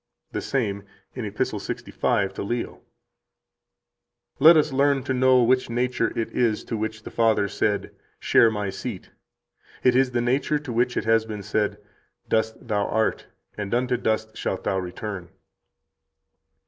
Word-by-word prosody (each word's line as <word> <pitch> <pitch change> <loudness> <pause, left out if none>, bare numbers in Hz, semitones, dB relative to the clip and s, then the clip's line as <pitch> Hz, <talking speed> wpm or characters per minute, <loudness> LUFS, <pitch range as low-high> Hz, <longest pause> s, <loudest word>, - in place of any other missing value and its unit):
88 - - -33
The - - -2
same, 100 -7 -1 0.3
in - - -5
Epist. - - -2
65 95 -1 -1
to - - -5
Leo: 120 +4 -3 1.6
"Let 160 +3 +8
us 150 -2 +2
learn 140 0 +2
to 130 - -1
know 130 -1 +4
which 130 +1 +2
nature 120 0 0
it 115 - -2
is 115 -3 +1
to 115 - -4
which 110 0 -4
the - - -8
Father 110 -3 +2
said, 100 +1 -1 0.3
Share 115 - +5
My 105 -3 -3
seat. 100 -1 -7 0.7
It 125 -1 +4
is 130 0 +4
that 120 -1 0
nature 135 +5 +1
to 145 -5 -6
which 125 +2 +1
it - - -1
has 115 0 +3
been 105 -2 -6
said, 105 +1 -1 0.5
'Dust 110 +2 -1
thou 105 -2 0
art, 110 0 0 0.3
and 105 +2 -2
unto 125 +1 +1
dust 110 -1 -1
shalt 95 - -3
thou 95 - 0
return.'" 90 0 -6
115 Hz, 160 wpm, -24 LUFS, 105-125 Hz, 1.6 s, Let